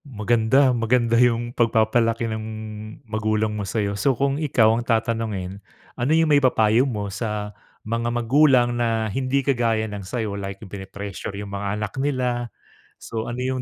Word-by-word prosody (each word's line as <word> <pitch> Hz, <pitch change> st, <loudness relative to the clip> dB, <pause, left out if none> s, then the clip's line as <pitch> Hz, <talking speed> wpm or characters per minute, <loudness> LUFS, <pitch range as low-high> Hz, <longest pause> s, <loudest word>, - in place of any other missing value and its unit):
Maganda, 120 Hz, +2 st, +2 dB
maganda 115 Hz, 0 st, +1 dB
yung 120 Hz, -1 st, +2 dB
pagpapalaki 115 Hz, 0 st, +2 dB
ng 110 Hz, -1 st, -3 dB, 0.6 s
magulang 110 Hz, 0 st, -1 dB
mo 105 Hz, -, -3 dB
sa’yo. 100 Hz, 0 st, -1 dB
So, 115 Hz, +5 st, +1 dB
kung 140 Hz, +2 st, 0 dB
ikaw 115 Hz, -7 st, +4 dB
ang 115 Hz, -, 0 dB
tatanungin, 110 Hz, -5 st, -2 dB, 0.3 s
ano 125 Hz, +4 st, -1 dB
yung 165 Hz, -, +4 dB
maipapayo 125 Hz, -2 st, +3 dB
mo 100 Hz, -4 st, -4 dB
sa 105 Hz, -1 st, -3 dB, 0.3 s
mga 115 Hz, +2 st, -1 dB
magulang 120 Hz, +1 st, +3 dB
na 115 Hz, -2 st, 0 dB
hindi 135 Hz, +1 st, 0 dB
kagaya 115 Hz, -4 st, +1 dB
ng 105 Hz, -2 st, -6 dB
sa’yo 110 Hz, +2 st, -3 dB
like, 100 Hz, 0 st, -5 dB
pini-pressure 100 Hz, 0 st, -7 dB
yung 100 Hz, 0 st, -7 dB
mga 100 Hz, +1 st, -2 dB
anak 105 Hz, -1 st, -4 dB
nila? 125 Hz, -4 st, -1 dB, 0.5 s
So, 110 Hz, 0 st, -5 dB
ano 120 Hz, -, -4 dB
yung 130 Hz, 0 st, -1 dB
115 Hz, 150 wpm, -23 LUFS, 105-125 Hz, 0.6 s, ikaw